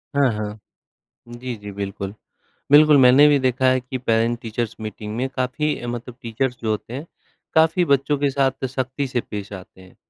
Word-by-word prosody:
हाँ, 140 Hz, -3 st, +4 dB
हाँ, 105 Hz, 0 st, -5 dB, 0.7 s
जी, 120 Hz, +1 st, -6 dB
जी, 105 Hz, -1 st, -9 dB
बिल्कुल। 100 Hz, 0 st, -5 dB, 0.6 s
बिल्कुल, 150 Hz, 0 st, +7 dB
मैंने 130 Hz, +3 st, +7 dB
भी 145 Hz, -, +4 dB
देखा 130 Hz, 0 st, +1 dB
है 130 Hz, 0 st, +3 dB
कि 125 Hz, +1 st, -6 dB
पेरेंट-टीचर्स 115 Hz, -1 st, -1 dB
मीटिंग 105 Hz, 0 st, -6 dB
में 130 Hz, +2 st, -1 dB
काफ़ी 130 Hz, +1 st, -2 dB
मतलब 120 Hz, 0 st, -6 dB
टीचर्स 125 Hz, +2 st, -2 dB
जो 110 Hz, -, -1 dB
होते 110 Hz, +2 st, -3 dB
हैं, 145 Hz, +5 st, -6 dB, 0.5 s
काफ़ी 160 Hz, +3 st, +4 dB
बच्चों 140 Hz, -1 st, +2 dB
के 140 Hz, 0 st, +1 dB
साथ 135 Hz, -1 st, 0 dB
सख़्ती 130 Hz, +2 st, -3 dB
से 125 Hz, -2 st, -1 dB
पेश 105 Hz, -2 st, -7 dB
आते 95 Hz, -1 st, -11 dB
हैं। 95 Hz, 0 st, -17 dB
125 Hz, 170 wpm, -22 LUFS, 110-135 Hz, 0.7 s, बिल्कुल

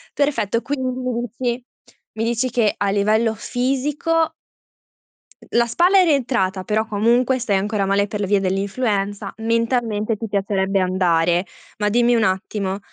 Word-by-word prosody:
Perfetto, 255 Hz, -6 st, 0 dB
quindi 270 Hz, -1 st, -3 dB
mi 255 Hz, 0 st, -3 dB
dici 240 Hz, +1 st, -3 dB, 0.5 s
mi 220 Hz, -, -2 dB
dici 235 Hz, +2 st, 0 dB
che 225 Hz, -4 st, +1 dB
a 200 Hz, -1 st, 0 dB
livello 215 Hz, +3 st, +2 dB
fisico 280 Hz, +8 st, -1 dB, 1.2 s
la 235 Hz, 0 st, +4 dB
spalla 355 Hz, -, +4 dB
è 370 Hz, -, +6 dB
rientrata, 240 Hz, -, +1 dB
però 215 Hz, +3 st, 0 dB
comunque 235 Hz, +5 st, +2 dB
stai 220 Hz, -5 st, 0 dB
ancora 205 Hz, +1 st, -1 dB
male 200 Hz, +1 st, +1 dB
per 210 Hz, +1 st, -5 dB
le 205 Hz, -, 0 dB
vie 200 Hz, +1 st, +3 dB
dell'influenza, 200 Hz, +1 st, -1 dB
mentalmente 230 Hz, -1 st, 0 dB
ti 225 Hz, -, -5 dB
piacerebbe 195 Hz, -1 st, 0 dB
andare. 180 Hz, -1 st, +2 dB, 0.3 s
Ma 210 Hz, 0 st, 0 dB
dimmi 240 Hz, +2 st, +3 dB
un 225 Hz, -, +2 dB
attimo: 190 Hz, 0 st, -1 dB
220 Hz, 145 wpm, -21 LUFS, 200-245 Hz, 1.2 s, è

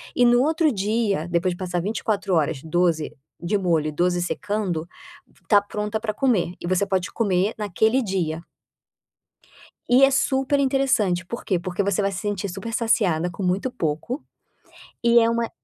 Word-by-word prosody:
e 245 Hz, -, +4 dB
no 240 Hz, 0 st, +5 dB
outro 315 Hz, +2 st, +2 dB
dia, 205 Hz, -, 0 dB
depois 175 Hz, +1 st, +1 dB
de -, -, -10 dB
passar 180 Hz, -2 st, -2 dB
24 205 Hz, -1 st, -2 dB
horas, 155 Hz, -4 st, +1 dB
12 165 Hz, -1 st, 0 dB, 0.3 s
de 180 Hz, +5 st, 0 dB
molho 170 Hz, -5 st, +1 dB
e -, -, -2 dB
12 175 Hz, +3 st, 0 dB
secando, 180 Hz, -3 st, -2 dB, 0.5 s
está 205 Hz, -2 st, +4 dB
pronta 210 Hz, +1 st, -3 dB
para 215 Hz, -1 st, -3 dB
comer, 210 Hz, -9 st, +1 dB
e -, -, -5 dB
você 185 Hz, +2 st, +1 dB
pode 190 Hz, -2 st, -1 dB
comer 200 Hz, -2 st, +1 dB
naquele 220 Hz, +5 st, +1 dB
dia. 175 Hz, -6 st, -2 dB, 1.4 s
E 255 Hz, +2 st, +5 dB
é 270 Hz, -, +7 dB
super 270 Hz, +1 st, +1 dB
interessante, 265 Hz, -10 st, +1 dB
por 235 Hz, +6 st, -7 dB
quê. 185 Hz, -3 st, +1 dB
Porque 180 Hz, +3 st, -2 dB
você 200 Hz, 0 st, 0 dB
vai 200 Hz, 0 st, 0 dB
se 190 Hz, -, -5 dB
sentir 200 Hz, -1 st, -3 dB
super 195 Hz, +5 st, -6 dB
saciada 190 Hz, -8 st, +1 dB
com 175 Hz, +3 st, -6 dB
muito 185 Hz, +7 st, 0 dB
pouco, 205 Hz, -, -3 dB, 0.8 s
e 235 Hz, 0 st, +5 dB
é 230 Hz, -, +3 dB
uma 230 Hz, 0 st, -1 dB
200 Hz, 170 wpm, -23 LUFS, 175-230 Hz, 1.4 s, é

